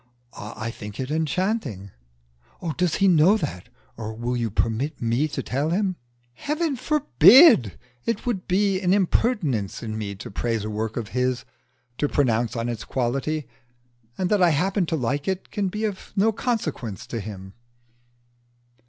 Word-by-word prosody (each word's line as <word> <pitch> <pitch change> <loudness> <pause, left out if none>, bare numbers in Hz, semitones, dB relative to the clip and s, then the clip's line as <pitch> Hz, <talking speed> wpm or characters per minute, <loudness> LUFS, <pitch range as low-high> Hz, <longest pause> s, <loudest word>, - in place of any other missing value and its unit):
"I 110 +2 -6
think 105 -3 -9
it 130 +2 -3
enchanting." 155 - -1 0.8
"Does 175 -2 +1
he 195 - +3
know 180 +4 +5
that? 130 - -5 0.3
Or 110 -1 -5
will 120 +2 -2
you 120 -2 -1
permit 115 +8 -1
me 120 +6 +1
to 150 - -4
tell 140 +5 -1
him?" 190 +1 0 0.4
"Heaven 300 - -2
forbid! 275 - +6 0.3
It 230 - -1
would 220 -7 -2
be 195 0 +2
an 185 0 +3
impertinence 175 - 0
in 110 -1 -4
me 100 -2 -4
to 95 - -9
praise 115 +1 -1
a 110 - -4
work 110 +1 -3
of 115 -3 -4
his 125 0 -1 0.5
to 145 - +1
pronounce 120 -4 +1
on 115 0 -2
its 120 -3 -4
quality; 135 +4 -2 0.7
and 185 0 -1
that 205 -2 +3
I 175 - +6
happen 180 +4 +1
to 165 - 0
like 140 +1 -2
it 190 0 -3
can 205 -2 -1
be 210 +4 -2
of 200 -3 -5
no 215 +2 +3
consequence 160 - -3
to 115 - -4
him." 95 -2 -8
145 Hz, 160 wpm, -24 LUFS, 115-195 Hz, 0.8 s, forbid